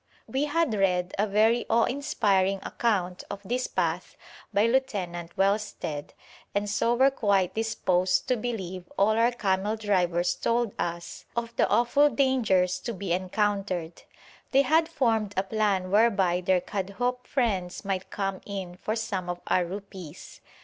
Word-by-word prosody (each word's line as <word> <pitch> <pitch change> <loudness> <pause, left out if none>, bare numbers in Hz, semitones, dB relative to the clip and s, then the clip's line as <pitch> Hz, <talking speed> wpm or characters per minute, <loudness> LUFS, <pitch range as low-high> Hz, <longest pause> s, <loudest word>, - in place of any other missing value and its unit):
We 270 +3 -1
had 305 -3 +1
read 180 -3 +1
a 210 - +2
very 220 +4 +3
awe 230 0 +4
inspiring 205 -9 +1
account 185 -6 -1
of 200 - -5
this 250 +4 -1
path - - -2 0.3
by 205 +2 +3
Lieutenant 195 -9 -1
Wellsted, 195 -7 -1 0.4
and 205 0 0
so 205 +4 +1
were 265 +3 +5
quite 200 -7 +1
disposed 185 -5 +1
to 255 - +2
believe 190 -7 -5
all 200 +2 +4
our 230 +2 +3
camel 205 -2 0
drivers 180 -5 +1
told 235 -2 0
us 170 0 -4
of 235 0 -3
the - - +2
awful 260 +5 +4
dangers 230 -11 +2
to 235 - -4
be 190 -2 -2
encountered. 185 -2 -1 0.5
They 275 +1 +4
had 320 +4 +3
formed 225 -9 0
a 190 - +2
plan 195 -3 0
whereby 200 -5 +3
their 180 0 +2
Kadhoup 230 +7 -3
friends 195 -9 -1
might 190 -1 -2
come 195 -1 -3
in 190 -3 -6
for 215 +3 -2
some 195 -5 -3
of 175 0 -3
our 180 - +2
rupees. 185 -3 -9
200 Hz, 150 wpm, -27 LUFS, 185-235 Hz, 0.5 s, were